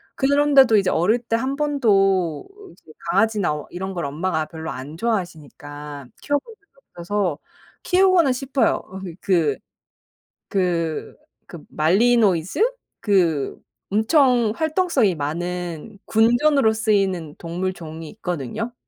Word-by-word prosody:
그런데도 275 -4 +4
이제 195 -2 +2
어릴 205 +9 +2
때 230 -1 -2
1 260 +4 -1
번도 195 - +1 0.3
이제 - - -19 0.2
강아지나 200 -10 +1
이런 190 +2 -5
걸 170 -4 -3
엄마가 155 +2 -2
별로 160 0 -7
안 135 +4 -8
좋아하시니까 150 - -5
키워본 290 +10 -2
적이 405 -2 -40 0.3
없어서 180 -3 -1 0.5
키우고는 365 -5 +4
싶어요. 265 +1 +1
어 190 +1 -10 0.2
그 165 -7 +1 0.9
그 170 -4 -1 0.3
그 170 -4 -10
말리노이즈? 190 - +2 0.4
그 170 -9 +1 0.3
엄청 240 +1 +3
활동성이 315 - +1
많은 175 +5 -4
군견으로 240 +2 +3
쓰이는 195 -8 0
동물종이 165 -2 -5
있거든요. 200 - -5
195 Hz, 255 characters per minute, -22 LUFS, 165-240 Hz, 0.9 s, 그런데도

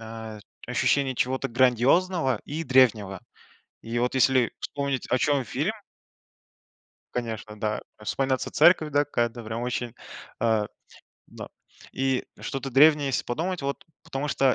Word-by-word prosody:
а, 110 -1 -8 0.3
ощущение 135 -2 +1
чего-то 130 +2 -1
грандиозного 130 - +2
и 155 +3 -4
древнего. 115 - +3 0.6
И 115 +1 -3
вот 125 +2 0
если 130 -2 +3
вспомнить, 140 -3 -3
о 130 - +3
чём 145 -1 +2
фильм 145 - -1 1.4
Конечно, 110 -3 -4
да. 105 0 -1 0.2
Вспоминается 130 +5 -1
церковь, 160 -3 +5
да 145 0 +3
какая-то 120 -4 -2
прям 110 +2 -4
очень, 120 -1 -3 0.5
а, 110 -2 +2 0.6
да, - - -10 0.4
и 135 -1 0
что-то 135 0 -5
древнее, 145 +2 +5
если 135 - -1
подумать. 170 +9 -2
Вот, 140 0 -4 0.2
потому 150 -2 -4
что 135 -3 +3
130 Hz, 130 wpm, -26 LUFS, 115-140 Hz, 1.4 s, церковь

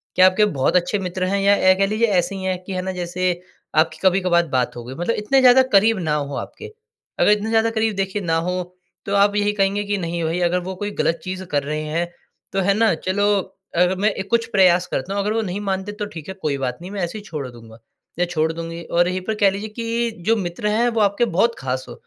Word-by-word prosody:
क्या 185 - +7
आपके 185 +3 +3
बहुत 155 -3 0
अच्छे 180 +3 +2
मित्र 185 -1 -3
हैं 200 +2 0
या 200 +1 +5
ए, 185 -1 +4
कह 195 +1 +2
लीजिए 215 +3 +1
ऐसे 195 -1 +1
ही 190 - -6
है 185 -1 -1
कि 195 - -5
है 185 - -2
ना 190 +1 -3
जैसे 180 0 -1 0.4
आपकी 155 0 +2
कभी-कभार 180 -2 +3
बात 130 -4 -1
हो 120 - -7
गई, 125 - -7
मतलब 175 +9 -1
इतने 215 +6 +2
ज़्यादा 255 0 +7
करीब 215 +2 +5
ना 160 -4 -1
हो 145 -1 -3
आपके। 445 0 -8 0.5
अगर - - +5
इतने 210 +1 +1
ज़्यादा 225 0 +3
करीब 220 -1 0
देखिए 195 +1 -2
ना 165 -3 0
हो, 180 0 -1 0.4
तो 200 - -1
आप 200 +1 +4
यही 205 0 +2
कहेंगे 200 0 +1
कि 205 0 -1
नहीं 170 -2 -3
भई 165 +2 -1
अगर 180 +1 +1
वो 190 - -4
कोई 205 +2 -4
गलत 165 0 0
चीज़ 185 0 -5
कर 145 - +2
रहे 150 +2 -3
हैं, 165 +3 -2 0.4
तो 195 - -1
है 200 +1 +3
ना 220 -1 +3
चलो 190 +5 -1 0.5
अगर 180 +2 +3
मैं 205 +2 +2 0.2
कुछ 235 -1 +2
प्रयास 180 -2 +4
करता 180 +4 -3
हूँ, 200 - 0
अगर 210 +2 -1
वो 225 - +1
नहीं 195 -2 -3
मानते 195 0 -2
तो 210 0 -5
ठीक 160 -7 -9
है - - -4
कोई 145 -2 -1
बात 125 -2 -3
नहीं 180 +2 -8
मैं 200 -1 -4
ऐसे 175 +5 -3
ही 210 - -9
छोड़ 150 -9 -5
दूँगा 115 -2 -14 0.4
या 180 - +3
छोड़ 160 -2 0
दूँगी। 165 +1 -6
और 175 +1 +1
यही 185 +1 -1
पर 220 - 0
कह 205 -2 +4
लीजिए 200 +3 -5
कि 230 +1 -2
जो 225 - +4
मित्र 180 +1 -3
है 225 +3 +2
वो 230 -1 -1
आपके 200 +3 +2
बहुत 230 +4 +1
ख़ास 130 0 -3
हो, - - -7
190 Hz, 255 wpm, -21 LUFS, 170-210 Hz, 0.5 s, क्या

